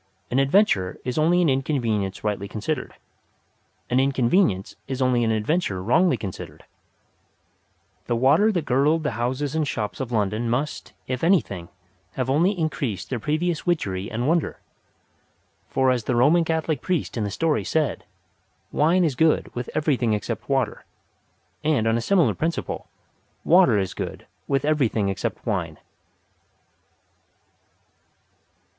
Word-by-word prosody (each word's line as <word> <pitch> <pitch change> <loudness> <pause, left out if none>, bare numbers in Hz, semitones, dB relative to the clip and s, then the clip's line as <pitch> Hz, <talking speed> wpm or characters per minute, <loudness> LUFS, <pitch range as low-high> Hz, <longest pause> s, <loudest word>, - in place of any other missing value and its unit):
An 130 - +2
adventure 135 - +2
is 125 +4 -1
only 175 +3 +3
an - - +3
inconvenience 120 -8 -1
rightly 105 -2 -2
considered. 125 +8 -4 0.9
An 125 - +2
inconvenience 130 - +1
is 130 -1 -4
only 130 -2 +2
an 115 - +1
adventure 110 - 0
wrongly 165 - +3
considered. 90 -6 -8 1.4
The 120 - +1
water 145 - +4
that 175 -7 -2
girdled 150 +5 +2
the 150 - 0
houses 130 +5 -2
and 160 -2 0
shops 105 -6 -3
of 130 -3 -4
London 110 +1 0
must, 135 +6 -3
if 130 +1 -4
anything, 100 - +1 0.4
have 130 0 -1
only 175 +8 +2
increased 140 - -3
their 125 - -1
previous 155 - -1
witchery 100 - -1
and 120 +3 -2
wonder. 165 0 0 1.1
For 130 -1 +2
as 120 -4 -1
the 125 - 0
Roman 155 +8 +4
Catholic 160 -4 -1
priest 180 -5 -2
in 115 - -1
the 105 - -2
story 160 +8 0
said: 155 -3 -1 0.7
"Wine 170 +5 +3
is 155 -5 +1
good 155 +5 +2
with 125 0 -5
everything 135 -7 +1
except 105 -3 -4
water," - - 0 0.8
and 150 -8 +2
on 115 0 +2
a 115 - 0
similar 180 +5 +3
principle, 165 +1 -3 0.6
water 175 - +5
is 95 -2 -1
good - - -6 0.2
with 135 -1 0
everything 125 -9 +1
except 100 +4 -4
wine. 90 - -2
130 Hz, 140 wpm, -24 LUFS, 110-155 Hz, 1.4 s, water